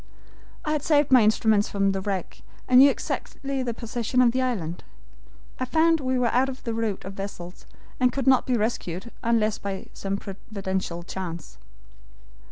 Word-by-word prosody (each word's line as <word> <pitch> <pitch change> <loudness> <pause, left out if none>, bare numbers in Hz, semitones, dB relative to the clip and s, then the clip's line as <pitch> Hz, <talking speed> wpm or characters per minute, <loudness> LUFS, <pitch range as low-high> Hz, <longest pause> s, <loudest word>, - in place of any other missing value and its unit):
"I 305 - 0
had 305 -1 0
saved 290 -2 +2
my 255 -2 +8
instruments 215 -1 +3
from 195 -1 +1
the 195 0 -2
wreck, 190 -2 -4 0.3
and 250 0 +7
knew 280 +2 +9
exactly 275 0 -3
the 240 -3 -3
position 235 +1 -2
of 245 -2 +6
the 260 +2 0
island. 185 -10 -2 0.8
I 255 - 0
found 325 +4 +3
we 260 -2 0
were 245 -2 +1
out 260 +2 +3
of 260 0 -8
the 230 - -3
route 225 -5 -2
of 195 - -6
vessels, 195 -3 -8 0.3
and 250 -1 +4
could 270 +1 -3
not 265 -1 +4
be 250 -2 +2
rescued 210 -2 -3
unless 220 -2 +1
by 195 -1 -5
some 195 0 -3
providential 190 -3 -4
chance. 170 - -7
225 Hz, 175 wpm, -25 LUFS, 195-255 Hz, 0.8 s, knew